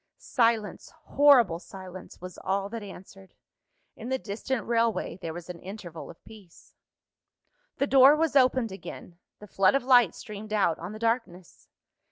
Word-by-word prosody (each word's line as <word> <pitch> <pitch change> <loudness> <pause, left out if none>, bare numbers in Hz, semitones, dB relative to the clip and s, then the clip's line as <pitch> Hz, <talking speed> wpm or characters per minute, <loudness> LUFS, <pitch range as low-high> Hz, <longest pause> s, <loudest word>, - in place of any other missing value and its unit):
Silence, 230 - -1
horrible 255 -12 +4
silence, 185 0 -11
was 180 0 -10
all 195 +1 -2
that 230 +1 -6
answered. 195 -1 -13 0.6
In 230 - -8
the 260 - 0
distant 230 +2 -4
railway 230 -5 0
there 165 - -5
was 170 +1 -9
an 180 -2 -8
interval 180 -4 -9
of - - -15
peace. 210 -6 -17 1.0
The 280 - +1
door 275 +1 +6
was 315 -2 0
opened 255 -4 +3
again; 180 -2 -10 0.2
the 210 - -12
flood 195 +2 +2
of 275 - 0
light 245 -7 +4
streamed 215 +1 -9
out 195 -6 +1
on 175 +5 -7
the - - -8
darkness. 225 -6 -3
210 Hz, 155 wpm, -27 LUFS, 185-245 Hz, 1.0 s, door